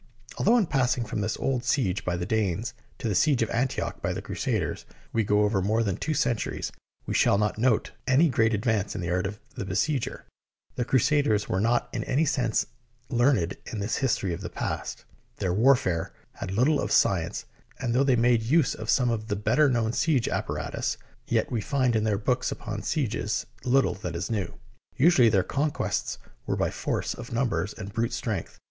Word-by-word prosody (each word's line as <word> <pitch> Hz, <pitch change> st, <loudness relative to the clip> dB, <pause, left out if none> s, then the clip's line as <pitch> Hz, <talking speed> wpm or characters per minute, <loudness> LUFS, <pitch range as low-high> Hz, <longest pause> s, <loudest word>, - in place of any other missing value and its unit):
Although 230 Hz, +5 st, +4 dB
in 220 Hz, -, +3 dB
passing 125 Hz, -5 st, +1 dB
from 105 Hz, -1 st, -3 dB
this 105 Hz, +2 st, -1 dB
old 130 Hz, -3 st, -1 dB
siege 120 Hz, -7 st, 0 dB
by 90 Hz, -1 st, -1 dB
the 90 Hz, -, -3 dB
Danes 110 Hz, +3 st, -1 dB, 0.2 s
to -, -, -3 dB
the 105 Hz, -, 0 dB
siege 130 Hz, -, +3 dB
of 115 Hz, -, -3 dB
Antioch 125 Hz, +3 st, -1 dB
by -, -, -1 dB
the -, -, -4 dB
Crusaders -, -, -2 dB, 0.3 s
we 115 Hz, -, +2 dB
go 105 Hz, +1 st, +3 dB
over 105 Hz, -2 st, +1 dB
more 110 Hz, +4 st, +1 dB
than 100 Hz, -4 st, -1 dB
two 155 Hz, -, -2 dB
centuries, 115 Hz, -6 st, -1 dB, 0.3 s
we -, -, -3 dB
shall -, -, +4 dB
not 105 Hz, +1 st, 0 dB
note 120 Hz, -2 st, +2 dB, 0.2 s
any 135 Hz, +6 st, +5 dB
great 115 Hz, -5 st, +2 dB
advance 105 Hz, -2 st, 0 dB
in -, -, -3 dB
the 85 Hz, 0 st, -2 dB
art 90 Hz, +1 st, +1 dB
of 105 Hz, +2 st, -7 dB
the -, -, -5 dB
besieger. 115 Hz, +8 st, -1 dB, 0.5 s
The 125 Hz, -, -2 dB
Crusaders 130 Hz, -4 st, +2 dB
were 95 Hz, -, 0 dB
not 120 Hz, +2 st, +2 dB
in -, -, -2 dB
any 145 Hz, +5 st, +2 dB
sense 130 Hz, -7 st, +1 dB, 0.4 s
learned 120 Hz, -, +2 dB
in 110 Hz, -, -5 dB
the 100 Hz, -, -2 dB
his 125 Hz, +3 st, +1 dB
tory 95 Hz, -3 st, -2 dB
of 85 Hz, -, -5 dB
the -, -, -5 dB
past. -, -, -4 dB, 0.3 s
Their 90 Hz, -, -1 dB
warfare 110 Hz, -6 st, +3 dB, 0.2 s
had -, -, -6 dB
little 130 Hz, +9 st, +2 dB
of -, -, -3 dB
science, -, -, +2 dB, 0.3 s
and 120 Hz, -3 st, -1 dB
though 130 Hz, +3 st, +4 dB
they 135 Hz, -2 st, +3 dB
made 120 Hz, 0 st, +3 dB
use 135 Hz, +6 st, +2 dB
of 110 Hz, -, -7 dB
some 125 Hz, -2 st, +3 dB
of 110 Hz, -1 st, -3 dB
the 105 Hz, -, -1 dB
better 145 Hz, +8 st, +3 dB
known 115 Hz, -3 st, +1 dB
siege 140 Hz, -6 st, +2 dB
apparatus, -, -, -2 dB, 0.3 s
yet -, -, 0 dB
we 115 Hz, -, 0 dB
find 130 Hz, -2 st, +1 dB
in 110 Hz, 0 st, +1 dB
their 105 Hz, -2 st, +1 dB
books 125 Hz, +4 st, 0 dB
upon 105 Hz, -1 st, -5 dB
sieges 115 Hz, -5 st, -1 dB, 0.2 s
little 135 Hz, +2 st, +3 dB
that 90 Hz, -4 st, -6 dB
is 85 Hz, +6 st, -3 dB
new. 100 Hz, -6 st, -2 dB, 0.4 s
Usually 135 Hz, -5 st, +6 dB
their 100 Hz, -4 st, +3 dB
con 145 Hz, +9 st, 0 dB
quests -, -, -2 dB, 0.3 s
were -, -, 0 dB
by -, -, 0 dB
force -, -, -2 dB
of 120 Hz, 0 st, -9 dB
numbers 115 Hz, -6 st, 0 dB
and 100 Hz, -2 st, -8 dB
brute 115 Hz, +1 st, -1 dB
strength. -, -, -4 dB
115 Hz, 200 wpm, -27 LUFS, 105-130 Hz, 0.5 s, Usually